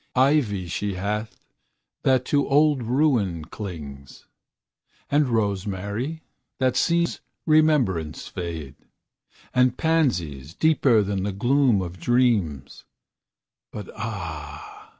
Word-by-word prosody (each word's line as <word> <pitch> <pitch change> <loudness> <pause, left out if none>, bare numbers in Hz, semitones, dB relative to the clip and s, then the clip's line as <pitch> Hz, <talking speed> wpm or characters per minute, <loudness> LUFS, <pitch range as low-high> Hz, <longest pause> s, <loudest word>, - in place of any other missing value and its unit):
Ivy 130 -8 +2
she 100 +3 -3
hath, 105 +4 -3 0.7
that 130 -1 +2
to 140 0 +1
old 145 -1 +4
ruin 115 - +1
clings; 75 -9 -9 0.9
And 145 0 +3
rosemary, 105 - -2 0.3
that 130 -2 +1
sees 170 0 +1 0.2
remembrance 145 - +2
fade; 80 -6 -6 0.8
And 125 -1 +3
pansies, 90 - 0
deeper 135 -8 +3
than 100 -1 -2
the 100 +2 -1
gloom 120 0 +2
of 90 0 -8
dreams; 105 - +1 0.9
But 105 -3 -7
ah! 85 -9 -7
105 Hz, 95 wpm, -24 LUFS, 90-135 Hz, 0.9 s, old